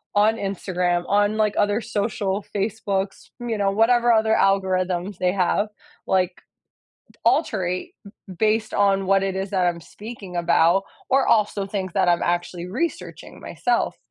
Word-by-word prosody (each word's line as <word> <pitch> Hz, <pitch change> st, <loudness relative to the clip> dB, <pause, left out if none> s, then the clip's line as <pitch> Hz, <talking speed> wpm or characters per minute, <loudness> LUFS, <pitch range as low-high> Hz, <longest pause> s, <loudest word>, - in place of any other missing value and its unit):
on 210 Hz, +2 st, +4 dB
Instagram, 180 Hz, -3 st, -1 dB
on, 205 Hz, +1 st, +2 dB
like, 215 Hz, -1 st, +1 dB
other 205 Hz, +2 st, +2 dB
social 205 Hz, -2 st, -2 dB
Facebooks, 200 Hz, -1 st, -2 dB
you 235 Hz, -2 st, -2 dB
know, 200 Hz, -1 st, +1 dB
whatever 235 Hz, +3 st, +4 dB
other 220 Hz, 0 st, +3 dB
algorithms 185 Hz, -2 st, +1 dB
they 180 Hz, 0 st, +1 dB
have, 200 Hz, +2 st, +1 dB, 0.4 s
like, 185 Hz, -1 st, 0 dB, 0.7 s
d -, -, -29 dB
alterate 180 Hz, 0 st, 0 dB
b 200 Hz, -2 st, -13 dB
based 220 Hz, +1 st, +1 dB
on 195 Hz, -1 st, +2 dB
what 195 Hz, 0 st, +3 dB
it 195 Hz, -1 st, -2 dB
is 190 Hz, 0 st, -3 dB
that 185 Hz, -3 st, +1 dB
I'm 170 Hz, -1 st, -1 dB
speaking 205 Hz, -1 st, -9 dB
about, 170 Hz, +2 st, +3 dB, 0.3 s
or 270 Hz, +1 st, +3 dB
also, 210 Hz, -2 st, +2 dB
things 190 Hz, -2 st, -4 dB
that -, -, +2 dB
I'm 175 Hz, -1 st, +3 dB
actually 175 Hz, 0 st, -2 dB
researching 330 Hz, -, -4 dB
myself, -, -, -1 dB
195 Hz, 150 wpm, -23 LUFS, 185-215 Hz, 0.7 s, on